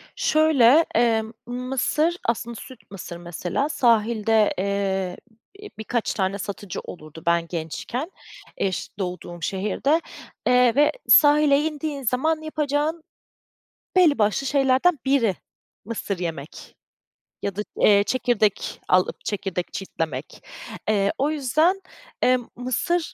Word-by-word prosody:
Şöyle, 310 Hz, -1 st, +4 dB
eee, 225 Hz, -1 st, +3 dB, 0.2 s
mısır, 265 Hz, +7 st, -1 dB
aslında 235 Hz, 0 st, -2 dB
süt 245 Hz, -2 st, -12 dB
mısır 180 Hz, -3 st, -8 dB
mesela, 175 Hz, -, -3 dB
sahilde, 225 Hz, -4 st, +2 dB
eee, 190 Hz, -1 st, -1 dB, 0.4 s
b-bi 415 Hz, -, -9 dB
birkaç 220 Hz, +1 st, -2 dB
tane 190 Hz, 0 st, -1 dB
satıcı 200 Hz, -1 st, -6 dB
olurdu 155 Hz, -1 st, -11 dB
ben 170 Hz, 0 st, +2 dB
gençken, 180 Hz, -, -5 dB, 0.5 s
eş 190 Hz, -2 st, -2 dB
doğduğum 180 Hz, -2 st, -5 dB
şehirde. 210 Hz, -, 0 dB, 0.5 s
Eee, 250 Hz, -1 st, +4 dB
ve 295 Hz, +1 st, +4 dB, 0.2 s
sahile 290 Hz, -1 st, +6 dB
indiğin 300 Hz, -2 st, -3 dB
zaman 310 Hz, +7 st, 0 dB
yapacağın 310 Hz, +1 st, -1 dB, 0.9 s
belli 345 Hz, -6 st, +5 dB
başlı 215 Hz, +6 st, +1 dB
şeylerden 275 Hz, +4 st, +3 dB
biri, 255 Hz, -8 st, +2 dB, 0.5 s
mısır 205 Hz, -4 st, -4 dB
yemek 160 Hz, -4 st, -6 dB, 0.7 s
ya 200 Hz, -, -3 dB
da, 210 Hz, -, -2 dB, 0.2 s
eee, 200 Hz, -1 st, +5 dB
çekirdek 225 Hz, -4 st, 0 dB
alıp, 185 Hz, 0 st, +1 dB
çekirdek 195 Hz, -4 st, -3 dB
çitlemek. 160 Hz, -7 st, -5 dB, 0.5 s
Eee, 200 Hz, -2 st, +2 dB
o 280 Hz, +3 st, +1 dB
yüzden, 310 Hz, +7 st, +1 dB, 0.4 s
emm, 250 Hz, -2 st, +2 dB
mısır 300 Hz, +8 st, -1 dB
235 Hz, 110 wpm, -23 LUFS, 195-290 Hz, 0.9 s, sahile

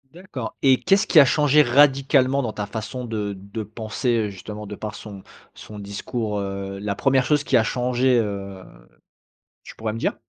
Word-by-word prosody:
D'accord, 165 Hz, -9 st, -7 dB
et 135 Hz, -2 st, +5 dB
qu'est-ce 195 Hz, +1 st, +3 dB
qui 155 Hz, -, +7 dB
a -, -, +6 dB
changé 150 Hz, +1 st, +4 dB
radicalement 135 Hz, 0 st, +3 dB
dans 115 Hz, -, -2 dB
ta 105 Hz, -1 st, -4 dB
façon 110 Hz, +5 st, -6 dB
de 105 Hz, -3 st, -3 dB
de 100 Hz, +3 st, -7 dB
penser, 110 Hz, +3 st, -3 dB
heu, -, -, -5 dB
justement, 105 Hz, +2 st, -8 dB
de 105 Hz, -, -7 dB
par 105 Hz, +1 st, -6 dB
son 100 Hz, -3 st, -10 dB, 0.3 s
son 105 Hz, -1 st, -11 dB
discours? 105 Hz, +2 st, -4 dB
Heu, 100 Hz, 0 st, -5 dB
la 100 Hz, 0 st, -3 dB
1re 135 Hz, +3 st, +2 dB
chose 150 Hz, 0 st, +1 dB
qui -, -, +1 dB
a 115 Hz, -, +5 dB
changé, 125 Hz, +1 st, +1 dB
heu, 100 Hz, -3 st, -4 dB, 1.0 s
tu -, -, -12 dB
pourrais 110 Hz, -1 st, -3 dB
me 115 Hz, -, -5 dB
dire? -, -, -1 dB
110 Hz, 185 wpm, -23 LUFS, 105-130 Hz, 1.0 s, qui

